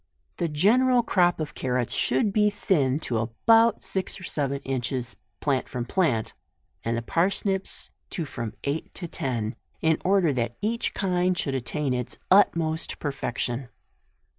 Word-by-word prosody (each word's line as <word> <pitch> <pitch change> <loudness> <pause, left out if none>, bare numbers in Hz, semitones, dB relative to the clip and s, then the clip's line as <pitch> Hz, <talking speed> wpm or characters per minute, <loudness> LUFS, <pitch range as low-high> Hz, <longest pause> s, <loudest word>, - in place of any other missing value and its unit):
The 170 - 0
general 240 +11 +4
crop 175 -6 +3
of 150 -3 -3
carrots 125 -2 -1
should 130 - +2
be 210 0 +4
thinned 155 -9 +1
to 115 -3 -1
about 225 - +3
six 190 -1 -1
or - - -11
seven 140 -5 -1
inch 130 -3 -2
es, 120 -3 -3 0.3
plant 140 -3 0
from 125 -2 -3
plant, 130 - +1 0.5
and 115 +1 0
the 115 - -3
parsnips 190 - -1 0.2
to 165 - -3
from 115 -5 -5
eight 145 +3 -2
to 175 - -5
ten, 120 -8 -2 0.2
in 160 -1 +2
order 185 -5 +3
that 120 -2 -2
each 230 +3 -1
kind 180 -2 +1
should 140 -4 -1
at 130 -2 -2
tain 145 -2 -1
its 125 -1 -3
utmost 170 -5 +3
perfection. 125 -3 -3
150 Hz, 155 wpm, -26 LUFS, 125-190 Hz, 0.5 s, general